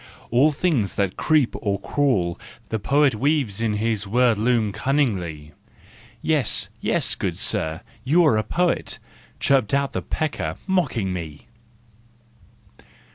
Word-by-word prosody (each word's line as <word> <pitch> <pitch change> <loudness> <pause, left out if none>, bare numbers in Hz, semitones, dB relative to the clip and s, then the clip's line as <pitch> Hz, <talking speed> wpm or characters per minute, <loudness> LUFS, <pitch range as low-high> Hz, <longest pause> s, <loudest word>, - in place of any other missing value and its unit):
All 135 +6 +4
things 145 - 0
that 100 -2 0
creep 155 -6 +2
or 100 -3 -1
crawl 100 -12 0 0.3
the 110 - -2
poet 140 +4 +3
Weaves 130 -4 0
in 110 -2 +1
his 105 -1 -1
word 120 +2 +3
loom 110 -1 +1
cunningly. 95 - -1 0.7
"Yes, 150 -8 +1
yes, - - +1
good - - -3
sir, 80 0 0 0.2
you 165 +6 +4
are 150 - +4
a - - +2
poet," 175 +6 0 0.4
Chirped 135 -1 +2
out 140 0 0
the - - -2
pecker, 155 -2 -3
mocking 140 - 0
me. 80 -5 -7
120 Hz, 130 wpm, -23 LUFS, 100-145 Hz, 0.7 s, All